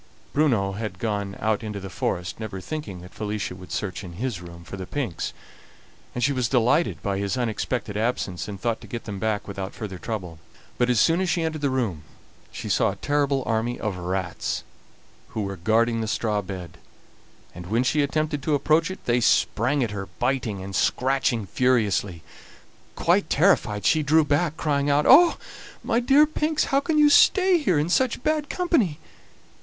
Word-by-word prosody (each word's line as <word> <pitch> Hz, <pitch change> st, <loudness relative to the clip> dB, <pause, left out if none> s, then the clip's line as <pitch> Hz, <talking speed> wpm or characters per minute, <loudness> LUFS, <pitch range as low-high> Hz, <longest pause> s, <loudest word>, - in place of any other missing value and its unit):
Bruno 120 Hz, -10 st, +2 dB
had 105 Hz, -2 st, -5 dB
gone 100 Hz, -1 st, -3 dB
out 110 Hz, +2 st, 0 dB
into 105 Hz, -2 st, -5 dB
the 95 Hz, -, -7 dB
forest, 90 Hz, +2 st, -3 dB
never 110 Hz, -4 st, -5 dB
thinking 105 Hz, -, -6 dB
that 90 Hz, -, -13 dB
Felicia 105 Hz, -3 st, -3 dB
would 90 Hz, 0 st, -12 dB
search 105 Hz, -1 st, -3 dB
in 90 Hz, -2 st, -8 dB
his 110 Hz, -1 st, -4 dB
room 85 Hz, -1 st, -11 dB
for 85 Hz, -, -8 dB
the 95 Hz, -1 st, -7 dB
pinks, 120 Hz, -, -3 dB, 0.8 s
and 120 Hz, -, -2 dB
she 140 Hz, -, +3 dB
was 125 Hz, -4 st, 0 dB
delighted 120 Hz, -, +2 dB
by 100 Hz, -1 st, -1 dB
his 100 Hz, +4 st, -1 dB
unexpected 120 Hz, -2 st, -2 dB
absence, 105 Hz, -7 st, -2 dB
and 100 Hz, -2 st, -7 dB
thought 115 Hz, +2 st, -1 dB
to -, -, -11 dB
get 115 Hz, -, -6 dB
them 100 Hz, -3 st, -6 dB
back 110 Hz, -1 st, -1 dB
without 95 Hz, -1 st, -6 dB
further 95 Hz, -4 st, -6 dB
trouble. 90 Hz, -8 st, -5 dB, 0.4 s
But 120 Hz, 0 st, +2 dB
as 120 Hz, -3 st, +3 dB
soon 165 Hz, -, +3 dB
as 185 Hz, -, 0 dB
she 170 Hz, 0 st, +1 dB
entered 160 Hz, -2 st, -3 dB
the 140 Hz, -, +1 dB
room 115 Hz, -12 st, -1 dB, 0.5 s
she -, -, -6 dB
saw -, -, +2 dB
a -, -, -4 dB
terrible 140 Hz, -2 st, 0 dB
army 115 Hz, +2 st, -1 dB
of 105 Hz, -4 st, -2 dB
rats, 90 Hz, 0 st, -3 dB, 0.6 s
who 110 Hz, -, -4 dB
were 100 Hz, 0 st, -4 dB
guarding 115 Hz, +5 st, +1 dB
the 110 Hz, -, -2 dB
straw 110 Hz, -1 st, 0 dB
bed; 95 Hz, -3 st, -8 dB, 0.7 s
and 90 Hz, 0 st, -9 dB
when 115 Hz, +6 st, +1 dB
she 150 Hz, +3 st, +2 dB
attempted 150 Hz, +1 st, -1 dB
to 150 Hz, +1 st, +1 dB
approach 155 Hz, +4 st, +2 dB
it 185 Hz, -, -8 dB
they 120 Hz, 0 st, +2 dB
sprang 125 Hz, +5 st, +2 dB
at 115 Hz, -, -2 dB
her, 100 Hz, -2 st, -5 dB
biting 120 Hz, -6 st, -1 dB
and 95 Hz, 0 st, -6 dB
scratching 125 Hz, -1 st, +1 dB
furiously. 105 Hz, -5 st, +1 dB, 0.7 s
Quite -, -, +2 dB
terrified, 105 Hz, -1 st, +2 dB
she 155 Hz, -, +4 dB
drew 155 Hz, +2 st, +3 dB
back, 150 Hz, +2 st, 0 dB
crying 145 Hz, -2 st, 0 dB
out: 145 Hz, +1 st, +3 dB
"Oh! 335 Hz, +6 st, +7 dB, 0.5 s
my 230 Hz, -, +1 dB
dear 275 Hz, +5 st, +5 dB
pinks, 310 Hz, 0 st, 0 dB
how 275 Hz, -, +2 dB
can 310 Hz, +2 st, -1 dB
you 295 Hz, -1 st, +6 dB
stay 370 Hz, +2 st, +5 dB
here 190 Hz, -, +1 dB
in 150 Hz, +2 st, +1 dB
such 245 Hz, +5 st, +1 dB
bad 305 Hz, -1 st, 0 dB
company?" 295 Hz, -, +1 dB
115 Hz, 185 wpm, -24 LUFS, 100-150 Hz, 0.8 s, Oh